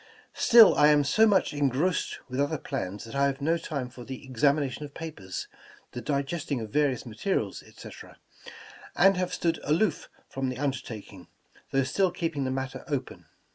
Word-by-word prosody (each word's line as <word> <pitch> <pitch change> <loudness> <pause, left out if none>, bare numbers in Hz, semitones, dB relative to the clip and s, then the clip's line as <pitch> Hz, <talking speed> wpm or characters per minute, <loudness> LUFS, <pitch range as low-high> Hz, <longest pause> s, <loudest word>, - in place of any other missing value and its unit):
Still 230 -3 +7
I 150 - +5
am 150 -1 +5
so 220 +11 +4
much 195 -6 +2
engrossed 145 +5 0
with 130 0 -4
other 145 +2 +1
plans 100 -5 -5
that 115 - -10
I 140 0 +2
have 135 0 -3
no 160 +4 +1
time 140 -7 -4
for 125 0 -11
the 130 +2 -8
examination 140 +2 +1
of 145 -1 -9
papers, 125 - -6 0.4
the 120 - -6
digesting 140 0 -2
of 110 -2 -7
various 140 -3 +1
materials, 110 - -2
etc., - - -13 0.8
and 195 +2 +5
have 180 0 -1
stood 165 -1 -1
aloof 165 +3 0 0.2
from 135 -1 -3
the 130 - -5
undertaking, 115 -8 -5 0.4
though 135 0 +2
still 185 +8 +1
keeping 165 -6 -3
the - - -1
matter 130 0 -4
open. 140 -4 -4
140 Hz, 170 wpm, -27 LUFS, 130-160 Hz, 0.8 s, Still